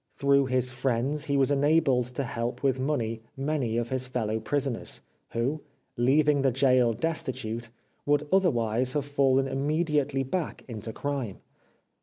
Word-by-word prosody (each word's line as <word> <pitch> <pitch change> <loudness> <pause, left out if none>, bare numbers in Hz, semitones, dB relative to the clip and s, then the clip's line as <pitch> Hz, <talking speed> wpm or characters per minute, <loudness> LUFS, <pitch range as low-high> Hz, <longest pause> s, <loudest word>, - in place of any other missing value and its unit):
Through 140 -1 +3
his 130 -1 +2
friends 130 +4 0
he 140 -2 +1
was 135 +1 +3
enabled 145 -3 +3
to 140 - -1
help 120 0 -4
with 130 -1 +2
money 120 -5 -1 0.2
many 135 -5 -1
of 120 0 -1
his 130 -1 -2
fellow 110 -3 -1
prisoners, 135 +1 -1 0.3
who, 130 +7 -1 0.3
leaving 140 +4 +3
the 135 -1 +3
gaol 125 -2 +3
destitute, 120 -6 -3 0.4
would 145 0 +2
otherwise 125 - +2
have 145 -2 -1
fallen 135 -2 +2
immediately 145 0 0
back 160 +5 -3
into 110 -2 -5
crime. 135 -6 -3
135 Hz, 140 wpm, -27 LUFS, 120-145 Hz, 0.4 s, Through